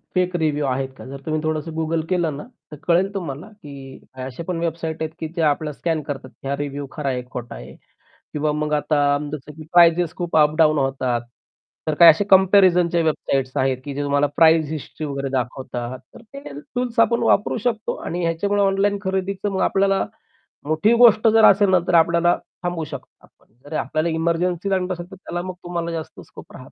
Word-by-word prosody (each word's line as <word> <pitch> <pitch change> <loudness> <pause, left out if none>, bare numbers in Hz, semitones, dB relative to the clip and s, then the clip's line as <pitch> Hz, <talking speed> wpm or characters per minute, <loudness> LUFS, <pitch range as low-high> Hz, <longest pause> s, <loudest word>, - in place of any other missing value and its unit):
Fake 180 -1 +1
review 150 -3 0
आहेत 135 0 -1
का? - - -11
जर 135 +1 -8
तुम्ही 155 -1 -1
थोडंसं 155 +1 -2
Google 160 0 -1
केलं 170 -6 0
ना - - -7 0.3
तर - - -7
कळेल 185 +4 +2
तुम्हाला 175 -3 -5
की 140 -10 -12 0.3
अशा 130 +5 -7
पण 180 -2 -2
वेबसाईट 165 -1 -3
आहेत 155 - -2
की 160 - -3
जे 170 - -1
आपल्याला 150 0 +1
स्कॅन 165 -2 -1
करतात 135 -2 -6 0.2
हा 140 - 0
रिव्ह्यू 145 -1 -4
खरा 150 -3 -3
आहे 125 -1 -2
खोटा 120 -1 -7
आहे. 65 +1 -11 0.6
किंवा 150 0 0
मग 150 0 -2
आता 145 -1 +2
जसं 150 0 -7
की 155 +1 -11
प्राइसेस 170 -1 +5
खूप 175 -3 -1
अप-डाउन 155 0 +4
होतात. 135 -3 0 0.7
तर 155 - +1
काही 170 -1 +10
असे 165 - -1
कम्पॅरिझनच्या 185 -3 +5
वेबसाईट्स 135 -4 -1
आहेत 130 -1 +1
की 140 - -5
जे 145 - -2
तुम्हाला 145 0 +2
प्राइस 160 -1 +5
हिस्ट्री 155 0 -6
वगैरे 140 -1 -3
दाखवतात, 125 0 -4 0.2
तर - - -12
ते 275 +5 -11 0.3
टूल्स 245 -1 -2
आपण 235 +1 +3
वापरू 210 0 +2
शकतो. 225 -1 -2
आणि 175 +1 -3
ह्याच्यामुळे 200 +5 0
ऑनलाईन 200 +1 +2
खरेदीचं 190 +1 -2
मग 190 - -2
आपल्याला, 195 0 +2 0.6
मोठी 155 +9 +2
गोष्ट 230 -2 +6
जर 220 0 +5
असेल 200 0 +3
ना 185 - +5
तर - - +1
आपल्याला 170 +1 +4 0.3
थांबवू 175 -2 -2
शकतो. 140 -3 -11 0.4
जर 145 - -13
आपल्याला 155 +4 -1
एमर्जन्सी 170 +3 -1
लागत 185 -1 0
असेल 175 -1 -6
तर 190 - -10
त्याला 175 -2 -5
मग 185 - -5
तुम्हाला 170 -1 -3
जास्त 160 -2 -6
स्कोप - - -14
राहत. - - -11
160 Hz, 190 wpm, -21 LUFS, 145-185 Hz, 0.7 s, काही